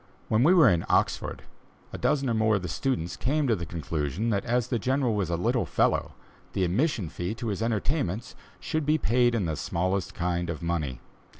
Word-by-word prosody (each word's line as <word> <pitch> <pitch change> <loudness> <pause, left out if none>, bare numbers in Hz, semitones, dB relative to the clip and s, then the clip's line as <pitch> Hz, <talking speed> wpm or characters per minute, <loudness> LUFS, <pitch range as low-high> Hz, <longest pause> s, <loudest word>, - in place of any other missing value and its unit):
When 110 +1 +3
we 155 +7 +6
were 160 -7 +7
in 85 -5 +3
Oxford, - - 0 0.5
a - - -4
dozen 140 -2 +1
or 120 - +1
more 110 -1 +3
of 100 - -2
the - - -3
students 90 - -2
came 145 +9 0
to 120 -4 +3
the 85 -3 -5
conclusion 80 - -2
that 100 -2 0
as 120 0 0
the 120 - 0
General 130 +1 +1
was 100 -5 -1
a 85 - +1
little 90 - 0
fellow, - - +1 0.4
the 95 - 0
admission 105 - +1
fee 90 +6 -4
to 115 -1 -4
his 100 +1 -3
entertainments 115 - -1 0.3
should 155 -2 -2
be 155 +1 +4
paid 120 -1 +2
in 105 -5 0
the 80 -2 -1
smallest 95 +5 -2
kind 85 -1 -1
of 85 0 -4
money. 75 -7 -2
105 Hz, 205 wpm, -27 LUFS, 85-125 Hz, 0.5 s, were